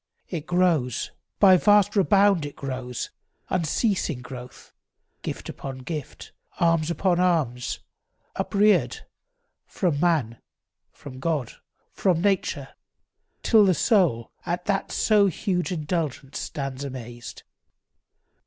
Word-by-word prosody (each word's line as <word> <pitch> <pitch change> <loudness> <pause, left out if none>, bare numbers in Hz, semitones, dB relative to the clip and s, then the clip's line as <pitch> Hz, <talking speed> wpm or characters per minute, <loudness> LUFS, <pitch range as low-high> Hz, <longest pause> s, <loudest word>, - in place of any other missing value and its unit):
It 160 -4 -5
grows— 170 - +1 0.3
By 190 -2 +7
vast 205 +2 +4
rebound 200 -3 +4
it 145 - -11
grows, 130 -3 -5 0.4
unceasing 170 - 0
growth; 125 -1 -10 0.5
Gift - - -5
upon 135 -1 -6
gift, 155 -5 -6 0.3
alms 165 -2 +2
upon 175 +1 +1
alms, 155 -9 0 0.5
upreared, 210 +1 +2 0.6
From 170 -7 -1
man, 150 -10 +1 0.5
from 130 -2 -11
God, 145 -4 -1 0.4
from 180 -4 +1
nature, 195 +1 0 0.7
till 220 -3 +6
the 185 -3 +4
soul 155 - +2
At 175 0 -3
that 195 -1 -1
so 210 -2 +4
huge 185 0 -1
indulgence 155 -4 -3
stands 135 -1 -5
amazed. 120 -3 -8
165 Hz, 105 wpm, -25 LUFS, 135-185 Hz, 0.7 s, By